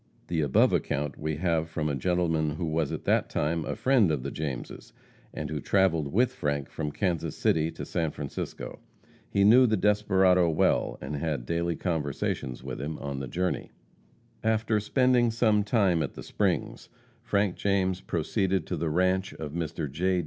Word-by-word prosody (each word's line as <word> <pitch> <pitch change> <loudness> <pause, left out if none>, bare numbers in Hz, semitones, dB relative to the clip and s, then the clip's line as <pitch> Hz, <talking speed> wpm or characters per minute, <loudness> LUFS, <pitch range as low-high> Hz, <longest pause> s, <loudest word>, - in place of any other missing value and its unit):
The 85 -2 0
above 70 -3 +3
account 75 +2 -1
we 80 0 -2
have 80 0 0
from 80 -1 -2
a 75 - -1
gentleman 80 -1 0
who 85 - -3
was 80 -2 0
at - - -4
that - - +2
time 80 +2 -1
a - - -3
friend 115 -3 +3
of 75 -5 -1
the 70 - -4
Jameses, 70 -6 -6 0.4
and 75 -1 -5
who 75 - -2
traveled 85 -7 +2
with 125 +4 +2
Frank 75 - -2
from 75 -2 -3
Kansas 90 -1 -2
City 80 0 +2
to - - -7
San 80 -2 -1
Francisco. 70 -2 -6 0.5
He 100 - +2
knew 120 +5 +7
the 110 -1 +2
desperado 95 -3 +3
well, 80 - +1
and 70 +3 -4
had 70 -5 -2
daily 85 +3 -1
conversations 75 -6 -2
with - - -5
him 75 +2 -4
on 70 -1 -5
the 65 - -4
journey. 90 +7 -2 0.7
After 110 0 +1
spending 125 +2 +3
some 110 -2 +2
time 100 -6 +2
at 70 - -3
the - - -8
Springs, - - -1 0.3
Frank 100 -5 0
James 95 -2 0
proceeded 95 +2 -1
to - - -3
the 80 +1 -1
ranche 95 +4 +1
of 75 -2 -6
Mr. 80 -1 -3
J. 90 +6 0
85 Hz, 175 wpm, -28 LUFS, 75-100 Hz, 0.7 s, knew